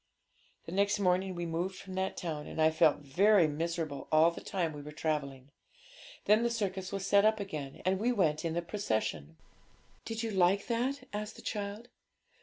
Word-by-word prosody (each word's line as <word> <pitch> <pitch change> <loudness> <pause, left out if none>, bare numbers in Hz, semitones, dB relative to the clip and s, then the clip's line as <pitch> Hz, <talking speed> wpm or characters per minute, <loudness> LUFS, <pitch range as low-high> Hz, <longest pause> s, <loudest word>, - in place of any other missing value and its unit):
The - - -7
next 200 +3 +2
day 190 -1 +1
we 175 -1 -4
moved 170 +3 -2
from 190 0 -9
that 190 0 -2
town; 155 -4 -4
and - - -7
I 160 0 +5
felt 155 -2 +3
very 180 +6 +4
miserable 160 -1 -3
all 160 +2 +6
the - - -9
time 170 -5 -2
we 145 - -7
were 150 +1 -9
travelling. 145 -3 -3 0.7
Then 210 +2 +5
the 235 - +2
circus 195 -5 -2
was 195 -1 -3
set 200 0 +5
up 215 0 +3
again, 150 -9 -6
and 190 0 +2
we 235 +4 +2
went 160 -10 +1
in 165 -1 -2
the 170 - -1
procession.' 110 - -2 0.7
'Did 225 0 -3
you 225 - -2
like 190 +1 +3
that?' 255 +3 -1
asked 210 +1 -4
the - - -12
child. 205 +2 -4
185 Hz, 190 wpm, -31 LUFS, 155-205 Hz, 0.7 s, all